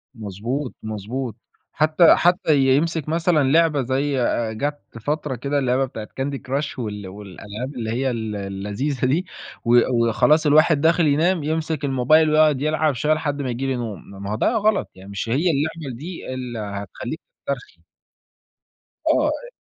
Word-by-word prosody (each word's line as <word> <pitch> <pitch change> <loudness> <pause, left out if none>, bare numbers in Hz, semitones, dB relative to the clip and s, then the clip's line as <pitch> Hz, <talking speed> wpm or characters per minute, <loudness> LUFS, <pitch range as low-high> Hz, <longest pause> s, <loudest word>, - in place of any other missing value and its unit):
مضبوط، 115 +6 -4
مضبوط. 110 +3 -4 0.4
حتّى 155 +2 +5
حتّى 175 -3 +3 0.2
يمسك 160 0 0
مثلًا 165 -2 +2
لعبة 160 -3 +4
زي 135 +1 0
آآ 115 -2 0
جات 145 +6 -3 0.2
فترة 150 +1 -2
كده 140 +4 -1
اللعبة 130 0 +1
بتاعة 110 -4 -8
candy 140 +1 -1
crash 140 +2 -3
وال 105 -4 -5
والألعاب 105 +6 -8
اللي 115 -3 -4
هي 130 +3 0
ال 110 -2 -3
اللذيذة 105 +8 -3
دي 155 +8 +1 0.4
و 120 +1 +5 0.3
وخلاص 155 +8 +3
الواحد 150 0 +5
داخل 165 0 +4
ينام، 160 +3 +2
يمسك 155 -1 -2
الموبايل 140 +4 +4
ويقعد 155 -3 +4
يلعب 155 -1 +1
شوية 150 +5 +1
لحد 145 -2 -2
ما 135 - -3
ييجي 125 +3 -2
لي 135 - 0
نوم، 115 -7 -6
ما 100 - -4
هو - - 0
ده - - +1
غلط. 215 -1 +1
يعني 95 +1 -13
مش 100 +3 -4
هي 155 +9 +2
اللعبة 150 -2 -2
دي 160 -2 -7
اللي 125 -3 -5
هتخلّيك 100 -1 -5 0.3
تسترخي. 415 +2 -5 1.3
آه. - - +3
أ - - -5
135 Hz, 160 wpm, -22 LUFS, 115-155 Hz, 1.3 s, حتّى